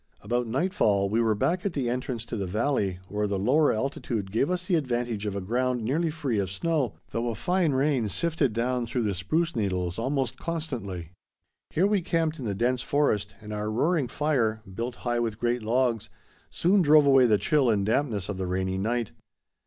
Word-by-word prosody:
About 120 0 -1
nightfall 110 - +1
we 115 +2 +2
were 110 -2 +2
back 175 - 0
at 200 - -1
the 135 -4 -1
entrance 125 -1 -3
to - - -5
the 100 -3 -2
valley, 105 -2 0
where 105 +2 -1
the 100 -1 -1
lower 135 +10 +3
altitude 110 -4 -3
gave 115 +7 +1
us 180 0 -1
the 185 - -1
advantage 120 -8 -1
of 100 - -3
a 100 - -2
ground 125 +4 0
nearly 155 +9 0
free 140 -8 -1
of 95 -2 -1
snow, 140 - -1 0.2
though 115 +1 -1
a 115 - -2
fine 175 - +1
rain 135 -4 +1
sifted 160 - 0
down 120 +2 -1
through 120 +1 -1
the 105 -2 0
spruce 160 - -1
needles 90 -4 -1
almost 130 0 -1
constantly. 120 - -4 0.6
Here 175 - +2
we 205 -1 +2
camped 165 -3 0
in 130 - -5
the 100 -3 -2
dense 125 +4 +1
forest, 105 -9 0
and 105 0 -7
our 105 0 -2
roaring 145 +6 +1
fire, 120 -6 0
built 120 +5 -4
high 120 -1 +1
with 115 -3 -1
great 120 +1 0
logs, 115 0 0 0.4
soon 190 +3 +3
drove 150 -2 +6
away 135 -2 +6
the 105 -2 +4
chill 130 +6 +2
and 100 -3 +2
dampness 110 -4 0
of 100 - -4
the 95 -1 -3
rainy 95 +1 -1
night. 115 +2 -1
120 Hz, 200 wpm, -27 LUFS, 105-145 Hz, 0.6 s, drove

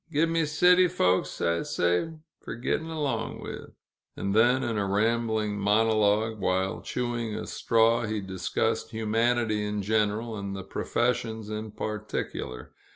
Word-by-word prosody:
Give 160 +2 +2
me 165 -1 +1
city 180 +4 +5
folks, 95 - +1
I 85 0 +1
say, 90 - 0 0.3
fer - - -7
get'n' 155 +7 -2
long 140 -8 -2
with!" - - -8 0.4
And 100 0 -1
then, 120 +4 +4
in 115 - -1
a 100 -2 0
rambling 110 0 0
monologue, 110 +1 +2
while 95 0 0
chewing 120 -3 -3
a - - -4
straw, 115 0 +2
he 110 0 -2
discussed 95 -2 -2
humanity 110 0 +1
in 105 -1 -2
general, 110 +2 0
and 100 -1 -4
the 95 - -6
professions 110 +1 -1
in 110 0 -4
particular. 105 - -5
110 Hz, 140 wpm, -27 LUFS, 105-120 Hz, 0.4 s, city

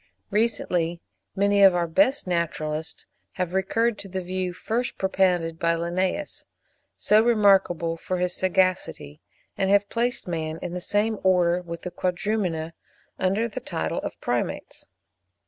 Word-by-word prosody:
Recently 180 -6 0 0.4
many 200 +1 +3
of 195 -2 +7
our 175 -1 +1
best 270 - +2
naturalists 160 -3 -3 0.3
have 180 -1 -3
recurred 215 +4 +1
to 200 - -8
the 190 0 -4
view 185 0 -2
first 230 +7 -3
propounded 180 -4 +1
by 170 0 +2
Linnaeus, 180 - -2 0.5
so 215 +1 +4
remarkable 195 -7 +3
for 185 +2 -3
his 180 0 0
sagacity, 185 - 0 0.4
and 195 - +1
have 200 0 +3
placed 240 0 -1
man 160 -2 -3
in 180 - -4
the 180 - -4
same 210 +3 0
Order 180 -2 +3
with 170 -1 -8
the 180 - -5
Quadrumana, 180 -3 -2 0.5
under 195 +5 +1
the 230 - -6
title - - -3
of - - -5
the - - -32
Primates. - - -3
185 Hz, 145 wpm, -25 LUFS, 170-205 Hz, 0.5 s, of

